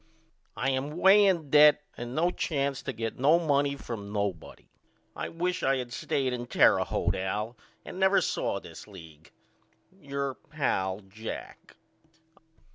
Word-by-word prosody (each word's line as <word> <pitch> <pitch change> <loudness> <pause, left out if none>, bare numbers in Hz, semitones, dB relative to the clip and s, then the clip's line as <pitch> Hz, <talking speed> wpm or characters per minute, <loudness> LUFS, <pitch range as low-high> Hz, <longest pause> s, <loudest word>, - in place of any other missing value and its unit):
I 135 +2 0
am 140 +4 -3
way 200 +3 +6
in 165 -7 0
debt 150 0 +7 0.2
and 120 +1 -7
no 170 +3 +2
chance 140 -6 -2
to - - -4
get 115 0 -5
no 150 +6 +5
money 145 -4 +1
from 110 -7 -7
nobody. 100 -5 -4 0.5
I - - -4
wish 180 +2 -2
I 135 0 +2
had 125 -1 -4
of - - -10
stayed 130 0 -1
with 120 0 -7
Terre - - +5
Haute - - -1
Al 105 +5 -3 0.3
and 185 - -8
never 190 +1 +4
saw - - -1
this - - -12
league. 80 -6 -14 0.6
Your 140 -6 -4
pal, 105 -11 -2
JACK. 105 +3 -9
135 Hz, 150 wpm, -28 LUFS, 110-155 Hz, 0.6 s, debt